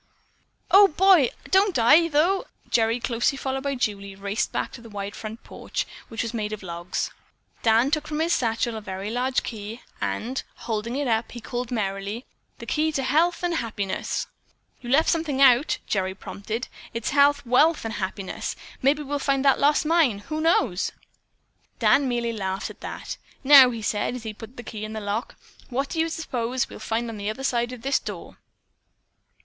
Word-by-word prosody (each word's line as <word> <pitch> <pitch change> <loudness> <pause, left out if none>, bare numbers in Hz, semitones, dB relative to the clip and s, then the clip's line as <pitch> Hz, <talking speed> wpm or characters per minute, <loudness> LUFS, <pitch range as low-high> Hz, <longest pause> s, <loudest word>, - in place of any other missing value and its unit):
"Oh, 400 +1 +9
boy, 365 -5 +5 0.2
don't 385 -3 +4
I, 300 +9 +6
though!" 335 +5 +2 0.3
Gerry, 230 +1 +2
closely 240 +3 0
followed 270 0 -2
by 280 0 -2
Julie, 200 -5 -2
raced 200 +2 -2
back - - -2
to - - -10
the 230 - -12
wide 200 -1 -5
front 220 +1 -7
porch, - - -4 0.2
which 225 - -3
was 230 - -4
made 215 -2 -2
of 210 - -7
logs. 170 0 -3 0.5
Dan 230 +4 +4
took 305 -1 0
from 305 0 -3
his 335 +2 +2
satchel 230 0 0
a 220 - -5
very 195 0 -5
large 255 +2 0
key 220 +1 -7 0.2
and 255 +4 -2
holding 225 +1 -3
it 285 0 -1
up, 225 -1 0
he 240 - -6
called 240 +1 -4
merrily, 205 +1 -3 0.3
"The - - -9
key 315 +1 +1
to 270 - -1
health 330 +7 +2
and 345 -1 +1
happiness." 205 -6 -2 0.6
"You 240 - -7
left 285 +5 +4
out - - +5
something," 320 -5 -1 0.5
Gerry 190 -2 -1
prompted. 215 +5 -5 0.3
"It's 230 - -2
health, 285 0 +4
wealth 295 +5 +3
and 225 - -3
happiness. 190 -2 -4 0.3
Maybe 290 +3 +2
we'll 290 +1 -2
find 275 -1 +1
that 275 - +5
lost 295 +2 +3
mine, 310 -9 +3
who 310 0 -2
knows?" 260 - +2 0.9
Dan 275 -2 +4
merely 235 -1 -1
laughed 195 -2 -3
at - - -17
that. - - -6 0.3
"Now," 275 -2 +9
he 230 -3 -5
said, 205 +4 -1
as 250 - -7
he 220 -1 -5
put 225 +4 -12
the 240 - -7
key 215 -2 -7
in 215 0 -5
the 220 - -3
lock, 210 +3 -3 0.3
"what 270 +2 -1
do 325 - -3
you 325 +1 +2
suppose 255 -6 -2
we'll - - -10
find 230 +2 -2
on 225 -2 -6
the 205 0 -3
other 220 +5 -5
side 240 -2 0
of 250 -2 -9
this 275 +1 +2
door?" - - -8
240 Hz, 190 wpm, -25 LUFS, 215-285 Hz, 0.9 s, Oh